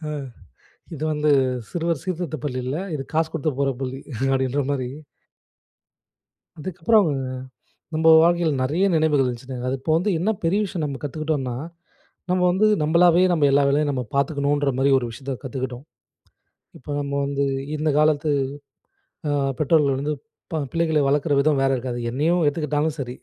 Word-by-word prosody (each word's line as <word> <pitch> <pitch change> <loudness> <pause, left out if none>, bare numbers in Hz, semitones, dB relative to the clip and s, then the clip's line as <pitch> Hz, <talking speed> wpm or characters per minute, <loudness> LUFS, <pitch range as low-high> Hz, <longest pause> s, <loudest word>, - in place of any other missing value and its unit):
ஆ, - - -3 0.8
இது 150 - -7
வந்து 150 0 +1 0.4
சிறுவர் 170 -4 -1
சீர்திருத்தப் 170 -5 -4
பள்ளி 130 -3 -2
இல்ல. 135 - -2 0.2
இது 135 - -4
காசு 160 0 +2
கொடுத்து 160 0 0
போற 140 - +2
பள்ளி. 130 0 -4 0.3
அப்பிடின்றமாரி. 135 0 0 1.7
இதுக்கப்புறம் 185 +4 +2 0.9
நம்ம 160 +1 +1 0.2
வாழ்க்கையில 170 -2 +3
நிறைய 160 +9 +1
நினைவுகள் 150 -4 +3
இருந்துச்சுங்க. 125 +1 -5
அது 135 - -1
இப்போ 155 +3 -1
வந்து 195 +5 +1
என்ன 200 +6 +1
பெரிய 180 +5 +2
விஷயம் 175 -5 -3
நம்ம 140 -2 -4
கத்துக்கிட்டோன்னா, 145 -3 -2 0.7
நம்ம 180 0 +2
வந்து 210 +4 +3 0.2
நம்மளாவே 170 +3 +5
நம்ம 155 -4 +3
எல்லா 140 0 +4
வேலையும் 145 +1 +2
நம்ம 130 -2 -2
பார்த்துக்கணுன் 140 +1 +1
றமாரி, 135 +1 +2
ஒரு 120 - -3
விஷயத்த 135 +3 -5
கத்துக்கிட்டோம். 130 0 -5 0.9
இப்ப 145 +3 -6
நம்ம 140 0 -4
வந்து 140 0 -1 0.3
இந்த 155 +1 -1
காலத்து 155 0 +2 1.0
ஆ - - +1 0.3
பெற்றோர்கள் 150 -3 +3
வந்து 150 +2 -1 0.4
ப 160 - 0
பிள்ளைகளை 160 -2 +1
வளர்க்குற 145 +1 +2
விதம் 145 -1 +2
வேற 135 - +2
இருக்காது. 125 -1 -4
என்னையும் 160 +7 +1
எடுத்துக்கிட்டாலும் 150 +1 0
சரி. 125 -2 -4
145 Hz, 145 wpm, -23 LUFS, 135-160 Hz, 1.7 s, நம்மளாவே